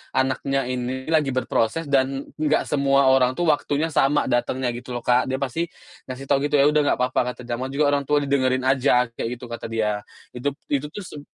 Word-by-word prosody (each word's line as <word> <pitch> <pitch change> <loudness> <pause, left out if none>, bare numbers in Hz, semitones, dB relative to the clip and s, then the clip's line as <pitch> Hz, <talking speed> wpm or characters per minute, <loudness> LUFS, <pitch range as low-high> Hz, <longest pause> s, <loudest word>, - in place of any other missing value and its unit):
anaknya 135 +1 0
ini 125 +1 -3
lagi 150 -5 +2
berproses, 130 +3 0
dan 135 0 +1 0.2
enggak 155 -1 +2
semua 140 -2 +3
orang 130 -1 +3
tuh 175 - -1
waktunya 150 +2 -1
sama 145 0 +3
datangnya 125 +1 0
gitu 120 +1 -7
loh, 120 - -5
Kak. 125 +1 +3
Dia 130 - -1
pasti 140 +5 -2 0.4
ngasih 130 +1 -6
tahu 140 +1 +1
gitu, - - 0
“Ya 140 - +5
udah 150 - +3 0.2
nggak - - -18
papa 125 +1 +1 0.2
kata 125 - -11
namanya 125 +3 -4
orang 145 -1 +2
tua 145 0 +2
didengerin 130 -2 +1
aja,” 130 -1 +3
kayak 115 +1 -4
gitu 120 0 -11
kata 115 - -5
dia. 110 -2 -1 0.3
Itu 135 +3 -3 0.2
itu 145 0 0
tuh 195 +7 -8
seb 150 -5 -9
130 Hz, 200 wpm, -23 LUFS, 125-145 Hz, 0.4 s, Ya